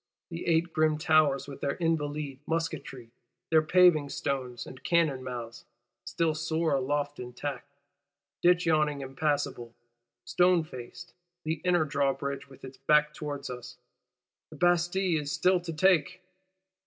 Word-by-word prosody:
The 165 +1 -6
Eight 165 0 +2
grim 155 -1 +2
Towers, 155 -4 +3
with 140 - -9
their 140 - -1
Invalides' 150 -4 -2
musketry, 160 -7 -4 0.4
their 160 -1 +6
paving 155 -3 +4
stones 125 -4 -3
and 130 - -12
cannon 155 -7 +1
mouths, 120 -2 -7 0.4
still 165 -2 0
soar 160 0 -1
aloft 145 +2 -1
intact;—Ditch 145 +5 -3
yawning 150 -3 +2
impassable, 135 -3 -2 0.5
stone 180 -1 +3
faced; 130 +5 -10 0.3
the 155 0 -3
inner 175 -3 +3
Drawbridge 140 -1 -2
with 135 0 -13
its 130 0 -11
back 150 +2 +3
towards 145 -2 -5
us: 125 0 -9 0.7
the - - -12
Bastille 175 -1 +2
is 145 -1 -5
still 185 +2 +3
to 175 -1 -6
take! 185 +1 +2
150 Hz, 130 wpm, -29 LUFS, 140-165 Hz, 0.7 s, their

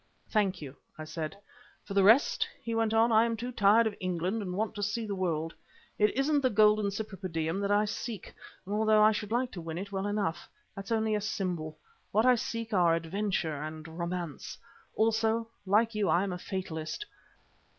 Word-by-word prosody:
"Thank 195 -6 +1
you," 135 -1 -8 0.2
I 155 - -6
said. 155 +1 -5 0.5
"For 200 - -6
the 200 - +4
rest," 225 +8 +5 0.2
he 230 - -3
went 225 -1 +1
on, 225 +1 +4
"I 225 +1 +4
too 235 +2 -5
am - - -8
tired 210 +2 +5
of 220 - 0
England 185 +4 -1
and 180 -3 -4
want 215 +2 -1
to 205 - -6
see 205 +3 -1
the 205 - -3
world. 165 -4 -1 0.5
It 210 0 +5
isn't 285 +1 +2
the 260 - +3
golden 210 -1 +4
Cypripedium 190 -4 -3
that 200 - -1
I 205 +1 +3
seek, 215 0 -5 0.3
although 215 +2 +3
I 215 - +7
should 210 0 -4
like 245 +2 0
to 175 - -7
win 165 0 -5
it 200 +2 -6
well 195 0 -2
enough. 200 -5 -2 0.3
That's 195 +2 -7
only 220 -1 +1
a 210 - 0
symbol. 180 -7 -3 0.3
What 215 +3 +3
I 255 - +7
seek 230 -1 -3
are 175 -3 +4
adventure 165 -3 -2
and 155 +1 -6
romance. 170 -3 -4 0.4
Also, 225 +1 +1 0.2
like 220 +4 +3
you 210 -2 0
I 175 - +3
am 195 -2 -2
a 180 - -5
fatalist. 175 - -4
205 Hz, 190 wpm, -30 LUFS, 175-220 Hz, 0.5 s, I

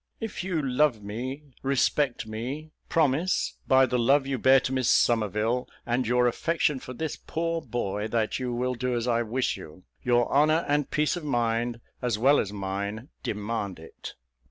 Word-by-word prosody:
If 225 -4 -4
you 180 -3 -1
love 125 -4 +2
me, 125 +8 -5 0.2
respect 135 -1 +1
me; 130 +8 -5 0.2
promise, 160 +2 +1
by 130 -1 +6
the 125 0 0
love 135 +4 +4
you 135 -2 -2
bear 135 +2 +6
to 130 - -2
Miss 130 -2 +1
Somerville, 115 +2 +2 0.2
and 120 0 0
your 125 +1 +3
affection 150 +3 +1
for 125 - -8
this 160 +4 -4
poor 165 0 -2
boy, 105 -6 -3
that 110 +1 0
you 125 -1 -2
will 125 +1 -1
do 125 0 -1
as 120 0 -1
I 120 -1 +2
wish 120 +3 -1
you. 80 +4 -12 0.2
Your 120 -1 +3
honour 155 +4 +4
and 145 0 +1
peace 150 +2 +1
of 175 - -6
mind, 120 -3 0 0.2
as 120 -4 0
well 135 +6 +5
as 100 - -1
mine, 100 +5 -4
demand 105 -2 -3
it." 80 0 -10
125 Hz, 175 wpm, -27 LUFS, 115-140 Hz, 0.2 s, by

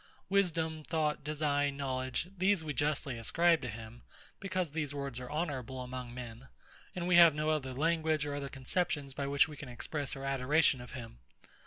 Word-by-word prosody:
Wisdom, 165 -5 +1
Thought, 155 -2 0
Design, 145 -1 0
Knowledge; 130 +4 -2
these 190 -1 +2
we 150 -2 -3
justly 145 -4 0
ascribe 165 +8 +3
to 125 - -4
him; 110 +2 -8 0.4
because 185 -4 -2
these 150 -2 -2
words 140 -3 -3
are 125 - -7
honourable 140 -5 -3
among 125 -1 -5
men, 120 0 -8 0.5
and 175 -1 -2
we 180 -1 +5
have 170 -3 +9
no 155 +1 +1
other 140 -4 -1
language 160 0 +1
or 145 - -3
other 140 -1 -4
conceptions 140 +1 -1
by 140 +1 -3
which 140 +4 +4
we 150 - -9
can 140 -2 -8
express 140 +4 -4
our 135 0 -6
adoration 135 +1 +3
of 125 - -10
him. 115 - -8
145 Hz, 180 wpm, -33 LUFS, 130-160 Hz, 0.5 s, have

